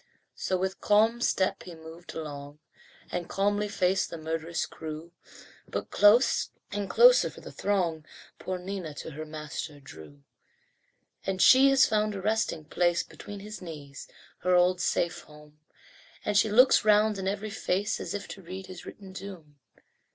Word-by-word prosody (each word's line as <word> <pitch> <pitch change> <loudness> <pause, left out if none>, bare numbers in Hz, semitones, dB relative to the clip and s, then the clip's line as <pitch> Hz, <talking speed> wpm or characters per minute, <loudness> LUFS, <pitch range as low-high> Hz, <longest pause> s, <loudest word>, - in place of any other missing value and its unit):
So 185 - -1
with 190 +1 -3
calm 220 +3 +3
step 190 -5 +1
he 175 -2 -10
moved 160 +2 -11
along, 145 -2 -7 0.5
And 175 -1 -3
calmly 205 +1 0
faced 190 -2 +1
the 170 - -6
murderous 160 +1 -3
crew, 160 +1 -8 0.6
But - - -5
close 215 +5 +4 0.2
and 205 -1 -3
closer - - +6
for - - -13
the - - -10
throng, 175 -6 -1 0.4
Poor 185 0 -3
Nina 180 -4 -6
to - - -7
her 155 +2 -7
master 150 -1 -6
drew. 75 - -13 1.0
And 190 -1 -2
she 265 +7 +7
has 270 -1 +6
found 215 -1 0
a 195 - -5
resting 215 -6 -1
place 175 +2 +1
Between 205 -1 -10
his 210 0 -8
knees 145 -5 -9 0.3
her 180 0 +2
old 180 0 +3
safe 175 0 0
home 150 0 -17 0.7
And 210 - 0
she 210 +2 +4
looks 250 +5 +6
round 210 -1 +4
in 190 - -3
every 205 +2 -3
face 200 -1 -1
As - - -4
if 200 -1 -5
to 195 - -8
read 185 +2 -8
his 185 -1 -10
written 195 -2 -11
doom. 175 -7 -10
185 Hz, 160 wpm, -28 LUFS, 160-205 Hz, 1.0 s, she